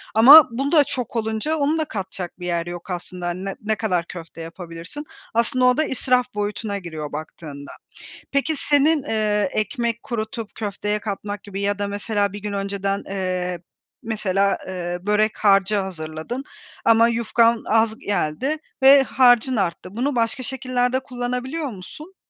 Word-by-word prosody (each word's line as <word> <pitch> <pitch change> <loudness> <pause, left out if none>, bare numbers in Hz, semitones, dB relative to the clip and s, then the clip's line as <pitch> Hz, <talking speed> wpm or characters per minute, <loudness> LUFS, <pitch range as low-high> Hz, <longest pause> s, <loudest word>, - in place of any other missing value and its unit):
ama 275 +7 +10
bu 275 +5 -2
da 305 -3 +6
çok 250 -4 -5
olunca 220 +7 -1
onu 300 +2 +1
da 315 - +1
katacak 190 - -6
bir 180 - -6
yer 170 -1 -1
yok 175 +2 -7
aslında. 180 0 -5
Hani 180 +2 -4
ne 195 - -4
ne 215 +1 0
kadar 185 -6 -1
köfte 165 -1 -9
yapabilirsin? 170 - -8 0.3
Aslında 235 +2 +2
o 250 0 +4
da 310 - +3
israf 250 -3 +1
boyutuna 205 0 -2
giriyor 160 -5 -6
baktığında. 150 -2 -8 0.6
Peki 280 +3 +1
senin, 295 +1 +3
eee, 210 -6 0
ekmek 235 +2 -2
kurutup 220 -1 -5
köfteye 210 0 -2
katmak 205 -1 -5
gibi 200 -1 -6
ya 200 0 0
da 205 - -1
mesela 205 0 -1
1 205 - -6
gün 205 0 -5
önceden, 200 0 -2
eee, 185 -2 -2 0.4
mesela, 200 -3 +1
eee, 175 -1 -4
börek 210 +2 +1
harcı 200 0 +3
hazırladın 170 +5 -5 0.4
ama 230 0 +6
yufkan 230 0 +2
az 220 0 +2
geldi 205 - -1 0.3
ve 270 +1 +8
harcın 255 -1 +4
arttı. 185 -1 -2
Bunu 270 +3 0
başka 235 +2 0
şekillerde 255 -1 0
kullanabiliyor 255 +4 -4
musun? 300 - -11
215 Hz, 155 wpm, -22 LUFS, 190-250 Hz, 0.6 s, ama